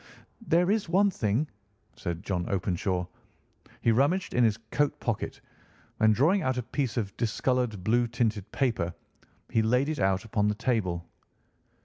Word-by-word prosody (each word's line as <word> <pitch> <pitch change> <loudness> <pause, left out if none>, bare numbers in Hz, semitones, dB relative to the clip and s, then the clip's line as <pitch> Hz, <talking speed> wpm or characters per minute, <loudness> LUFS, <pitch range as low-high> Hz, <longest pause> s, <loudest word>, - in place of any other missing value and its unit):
"There 175 +3 +3
is 210 -5 0
one 195 +3 +4
thing," 115 - 0 0.5
said 85 +1 -4
John 90 -4 -2
Openshaw. 90 -1 -1 0.8
He 115 - +3
rummaged 145 +11 +2
in 125 - +3
his 110 -2 +3
coat 145 -1 +1
pocket, 115 -3 -3 0.6
and, 110 -1 +5
drawing 170 - +3
out 130 -4 0
a 125 - -1
piece 130 +1 -2
of 100 -4 -2
discoloured, 120 -3 0
blue 120 +4 +2
tinted 115 -4 -1
paper, 110 -11 0 0.6
he 110 - +3
laid 125 +6 +2
it 155 - -2
out 95 0 +1
upon 105 -1 +1
the 105 - +1
table. 105 -8 -1
115 Hz, 150 wpm, -28 LUFS, 100-135 Hz, 0.8 s, and